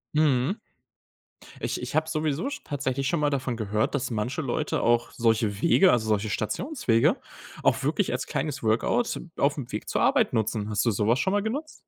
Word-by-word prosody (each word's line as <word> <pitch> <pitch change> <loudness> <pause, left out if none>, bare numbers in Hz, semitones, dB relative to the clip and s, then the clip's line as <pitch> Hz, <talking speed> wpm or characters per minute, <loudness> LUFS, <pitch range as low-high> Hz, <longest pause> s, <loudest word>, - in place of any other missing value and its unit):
Mhm. 150 - +2 1.0
Ich - - -2
ich - - -4
habe 155 0 +2
sowieso 155 - -1
sch 290 0 -7
tatsächlich 135 -2 -2
schon 170 - 0
mal 145 -1 +2
davon 130 -4 -2
gehört, 110 +2 -1
dass 130 -3 -1
manche 120 +7 -2
Leute 150 +2 -1
auch 120 0 +2
solche 110 -3 +1
Wege, 185 +2 +5
also, 110 -3 +2
solche 105 0 +1
Stationswege 115 - +1 0.5
auch - - +2
wirklich - - 0
als - - -2
kleines 145 -3 -3
Workout 115 - +1 0.2
auf'm 140 -3 0
Weg - - -5
zur - - 0
Arbeit - - +3
nutzen. 110 -1 -1
Hast 105 -2 0
du 120 - +3
sowas 110 +4 +1
schon 190 - 0
mal 205 0 +2
genutzt? 285 +9 -3
130 Hz, 180 wpm, -26 LUFS, 110-155 Hz, 1.0 s, Wege